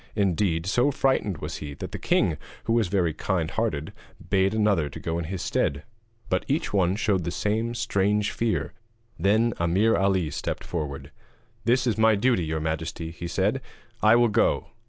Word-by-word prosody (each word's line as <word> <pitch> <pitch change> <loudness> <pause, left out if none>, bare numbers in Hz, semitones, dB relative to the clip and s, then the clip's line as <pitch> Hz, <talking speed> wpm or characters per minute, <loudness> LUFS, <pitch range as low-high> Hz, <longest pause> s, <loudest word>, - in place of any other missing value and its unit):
Indeed, 90 -4 +1
so 120 +8 +2
frightened 130 - +1
was - - -5
he, 70 -1 -7
that - - -7
the - - -5
king, - - +2 0.3
who 115 - 0
was 115 -4 +2
very 90 -4 +1
kind 85 -3 -1
hearted, 80 -10 -2 0.4
bade 95 +2 +3
another 100 -9 +2
to - - -9
go 85 0 -2
in 85 - -3
his 90 +2 -4
stead, 70 +1 0 0.4
but 95 - 0
each 150 -1 -1
one 95 -2 +2
showed 100 -4 +1
the 85 - -2
same 110 +6 -1
strange 105 -1 +1
fear. 115 -2 -1 0.5
Then 110 +6 +3
Ameer 95 +7 +3
Ali 95 -5 +1
stepped - - -4
forward: 75 -4 -5 0.5
'This 125 +1 +3
is 115 -3 +1
my 110 0 +5
duty, 110 -4 +2
your 80 0 -2
majesty,' 80 +1 -3
he 85 +1 -6
said, 100 +9 0 0.4
'I 110 +2 +6
will 120 -1 +4
go.' 105 - +1
95 Hz, 175 wpm, -26 LUFS, 85-110 Hz, 0.5 s, I